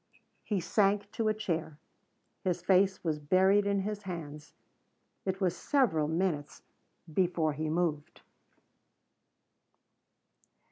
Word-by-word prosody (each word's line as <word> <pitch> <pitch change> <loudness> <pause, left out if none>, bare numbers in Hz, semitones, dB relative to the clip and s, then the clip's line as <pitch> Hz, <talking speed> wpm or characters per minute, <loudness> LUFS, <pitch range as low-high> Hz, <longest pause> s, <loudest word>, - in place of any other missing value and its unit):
He 205 -3 -1
sank 200 +3 +1
to 225 - -1
a 215 - +3
chair. 165 -7 -3 0.7
His 180 -2 -1
face 190 +1 +3
was 155 -3 -1
buried 190 +6 +3
in 200 -1 +1
his 210 +1 -4
hands. 150 -6 -7 0.7
It 190 0 -2
was 180 -3 +1
several 200 - +1
minutes 160 -3 -2 0.5
before 170 -3 +1
he 155 +2 -3
moved. 155 -3 -2
180 Hz, 105 wpm, -31 LUFS, 160-200 Hz, 0.7 s, a